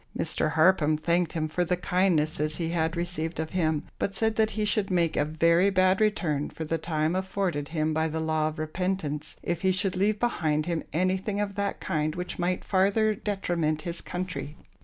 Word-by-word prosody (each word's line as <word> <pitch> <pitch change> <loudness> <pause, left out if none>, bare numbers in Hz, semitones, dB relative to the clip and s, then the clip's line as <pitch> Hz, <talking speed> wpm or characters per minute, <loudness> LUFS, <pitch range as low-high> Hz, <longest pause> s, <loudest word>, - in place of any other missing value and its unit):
Mr. 155 - 0
Harpham 155 -2 +4
thanked 170 +2 +1
him 155 -1 -1
for 160 +3 0
the 180 +1 0
kindnesses 155 -5 +1
he 165 -2 -2
had 165 0 0
received 170 -2 -2
of 160 0 -3
him, 160 -5 0 0.2
but 200 - -1
said 220 -1 +1
that 220 -1 +3
he 215 - +1
should 210 -1 +1
make 170 -3 +1
a - - +3
very 165 +5 +3
bad 185 +1 +3
return 165 -9 +1
for 160 - -6
the 165 +1 -1
time 155 +1 0
afforded 185 -6 -2
him 155 -1 0
by 160 +1 +1
the 160 0 -3
law 155 -1 +1
of 155 +1 -5
repentance, 155 -2 -3
if 175 -1 -2
he 190 -1 +3
should 185 0 0
leave 205 +3 +1
behind 155 -10 0
him 170 -2 -1
anything 185 +4 0
of 205 -1 -1
that 200 0 -2
kind 155 0 -1
which 180 +1 -5
might 180 +1 -1
farther 200 +3 +3
detriment 175 -7 -1
his 170 0 -4
country. 180 -4 -5
170 Hz, 195 wpm, -27 LUFS, 155-190 Hz, 0.2 s, Harpham